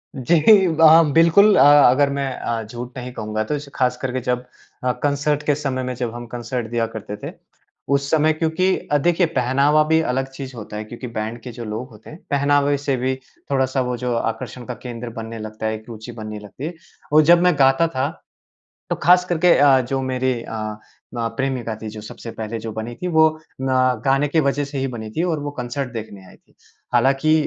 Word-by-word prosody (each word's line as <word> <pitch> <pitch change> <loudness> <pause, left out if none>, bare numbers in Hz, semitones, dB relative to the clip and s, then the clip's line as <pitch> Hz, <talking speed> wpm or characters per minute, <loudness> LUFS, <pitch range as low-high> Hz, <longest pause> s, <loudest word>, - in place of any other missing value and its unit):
जी। 170 - +5
वहाँ 160 -1 +6
बिल्कुल 170 +6 +6
अ, - - +5 0.3
अगर 140 +3 +3
मैं 140 -1 -2
अ, 115 -1 -2
झूठ 120 +4 -8
नहीं 125 0 -6
कहूँगा 110 -1 -3
तो 150 +7 -2 0.2
ख़ास 125 -1 +1
करके 130 -1 -2
जब 125 0 -2 0.4
अ, 125 - +2
कंसर्ट 145 +1 0
के 145 - +2
समय 135 -3 -3
में 130 0 -3
जब 120 -2 -3
हम 120 0 -7
कंसर्ट 120 0 -4
दिया 115 -1 +1
करते 105 -1 -6
थे। - - -4 0.6
उस 140 0 -1
समय 155 0 +3
क्योंकि 165 +4 +1 0.2
अ, 145 - +4
देखिए 175 +4 +2
पहनावा 140 +4 +3
भी 160 0 +4
अलग 135 -3 -1
चीज़ 135 -1 -8
होता 105 -2 -7
है 105 - -4
क्योंकि 120 +3 -8
बैंड 115 0 -4
के 125 - -8
जो 120 0 -8
लोग 110 +4 -5
होते 110 -1 -15
हैं 155 - -11
पहनावे 145 0 +2
से 140 -1 -1
भी 130 +1 -1 0.4
थोड़ा-सा 130 -1 +1
वो 125 -1 -2
जो 125 0 -2
आकर्षण 115 +2 -4
का 125 - -5
केंद्र 120 -1 -6
बनने 115 0 -7
लगता 110 0 -7
है 110 0 0
एक 110 0 -11
रुचि 115 +1 -8
बनने 110 -2 -7
लगती 105 +7 -9
है। 170 - -4 0.4
और 155 - +7
जब 175 0 +6
मैं 180 0 +4
गाता 135 +4 +4
था 135 -2 -1 0.8
तो - - 0
ख़ास 180 +1 +5
करके 175 0 +3
अ, 140 -2 +6
जो 135 +2 -2
मेरी 130 0 0
अ, - - -9
अ, 110 -1 -4 0.6
प्रेमिका 130 -4 -2
थी 110 - -5
जो 105 0 -8
सबसे 110 +2 -9
पहले 110 0 -5
जो 110 0 -6
बनी 110 +2 -5
थी 180 - -1
वो 160 -2 +5 0.3
म 135 - -2 0.4
गाने 135 +2 +2
की 160 +3 +2
वज़ह 140 0 0
से 140 0 -6
ही 135 - 0
बनी 110 -1 -7
थी 160 - -2
और 165 -4 -1
वो 145 0 -4
कॉन्सर्ट 125 +1 -4
देखने 105 -4 -8
आई - - -16
थी। - - -33 0.4
हालाँकि 135 +5 +3
130 Hz, 210 wpm, -21 LUFS, 115-145 Hz, 0.8 s, और